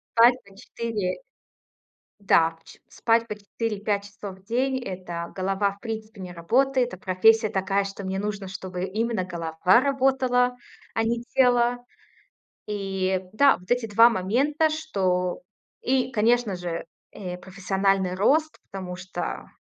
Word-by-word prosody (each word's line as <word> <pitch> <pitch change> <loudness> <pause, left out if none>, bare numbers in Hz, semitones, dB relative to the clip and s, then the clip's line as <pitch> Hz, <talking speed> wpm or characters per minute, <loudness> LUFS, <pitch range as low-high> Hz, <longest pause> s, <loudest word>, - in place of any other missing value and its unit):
Спать 235 +2 +7
по 200 -1 -18
4 210 -3 -3 1.0
Да, 165 -5 +4
по 165 0 -24
че - - -15
спать 230 0 +1
по 210 - -3
4-5 205 -1 -2
часов 200 -2 -9
в 190 - -25
день- 260 +5 0
это, 175 -3 -6
голова, 195 +1 0
в 200 - -18
принципе, 220 -2 -6
не 180 -1 -7
работает. 250 +9 +1
А - - -9
профессия 215 +4 +4
такая, 195 +1 0
что 195 0 -7
мне 190 0 -2
нужно, 205 -1 -3
чтобы 185 -1 -5
именно 220 0 -1
голова 170 +3 +2
работала, 260 -2 +2 0.4
а 225 - +1
не 235 +1 -1
тело. 245 -1 +4 0.9
И, 195 -2 -1
да, 275 +6 +5
вот 180 - -18
эти 245 -1 +2
2 225 +2 +7
момента, 260 +10 +1
что 185 - -1 0.4
И, 255 0 +1
конечно 230 -2 +2
же, 175 -2 -4 0.3
э, 180 -3 -6
профессиональный 190 0 0
рост, 305 +11 +2
потому 185 -2 -6
что 180 +1 -5
205 Hz, 140 wpm, -25 LUFS, 185-240 Hz, 1.0 s, Спать